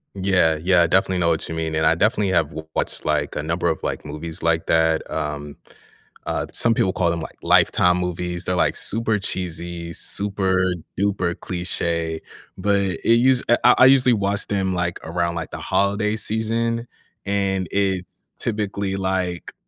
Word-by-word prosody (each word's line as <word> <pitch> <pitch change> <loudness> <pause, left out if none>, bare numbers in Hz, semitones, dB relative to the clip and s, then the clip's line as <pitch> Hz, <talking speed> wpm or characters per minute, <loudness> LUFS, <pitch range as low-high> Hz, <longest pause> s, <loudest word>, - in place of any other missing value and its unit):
Yeah, 95 -5 +2
yeah, 85 0 +4
definitely 95 +1 +2
know 85 -1 +2
what 80 -1 -1
you 80 - -4
mean, 80 -1 -2
and 80 0 +2
I 80 - +4
definitely 105 +1 +1
have 80 -3 +2
w 80 -1 -8
watched, - - -2
like, - - -1
a - - -1
number 85 +3 -1
of, 80 - -1
like, - - -4
movies 80 +3 -7
like 85 -1 +1
that. 80 -1 +2
Um, 75 -2 -4 0.7
uh, - - -1
some 115 -1 +2
people 95 -3 +1
call 85 -2 +1
them, 85 0 -1
like, 80 - -8
"Lifetime 90 0 +4
movies." 90 0 -3
They're, 90 - 0
like, - - +2
super 110 0 +1
cheesy, 85 -3 -4
super 95 0 -1 0.4
duper 95 -4 0
cliche, 85 -2 -2 0.4
but 100 -1 +2
it 95 -4 -3
use 125 +1 +4
eh, 120 - +5
I 125 - +7
I 130 - +8
usually 130 -2 +6
watch 100 -1 0
them, 95 -2 0
like, 90 0 -2
around, 85 +1 -1
like, 85 - -4
the - - -5
holiday 105 +2 0
season, 115 +2 -1 0.4
and 95 -2 0
it's 95 -2 -2
typically 100 -3 -2
like 95 -2 -2
90 Hz, 170 wpm, -22 LUFS, 85-100 Hz, 0.7 s, I